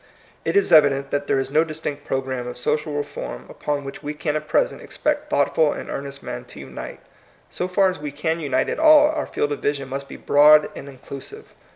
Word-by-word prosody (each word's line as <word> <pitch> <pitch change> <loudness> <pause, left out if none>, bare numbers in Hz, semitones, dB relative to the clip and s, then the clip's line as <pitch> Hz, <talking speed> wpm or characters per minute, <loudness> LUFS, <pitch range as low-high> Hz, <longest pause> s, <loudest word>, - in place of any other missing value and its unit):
It - - -1
is 400 - +3
evident 140 -3 +5
that 145 0 -1
there - - +2
is 135 - -2
no 155 - +4
distinct 155 -2 -5
program 130 -2 -2
of 125 - -6
social 150 +4 -1
reform 145 - -5
upon 145 -1 -3
which 135 - -8
we 150 +1 -5
can 150 0 -2
at 150 0 -3
present 155 - +1
expect - - -2
thoughtful 155 -2 +2
and - - -7
ear - - -3
nest 140 0 -9
men - - -5
to - - -13
unite. - - -8 0.5
So 180 - -2
far 190 +1 +3
as 185 -3 -2
we 150 -1 -5
can 160 +3 -2
unite 140 -5 0
at - - -3
all, 310 -1 +7
our 310 -1 -3
field 145 - -1
of 145 - -2
vision 140 -2 -2
must 140 +1 -5
be - - -8
broad 150 +1 +6
and 140 - -8
inclusive. 140 - -10
145 Hz, 220 wpm, -22 LUFS, 140-160 Hz, 0.5 s, all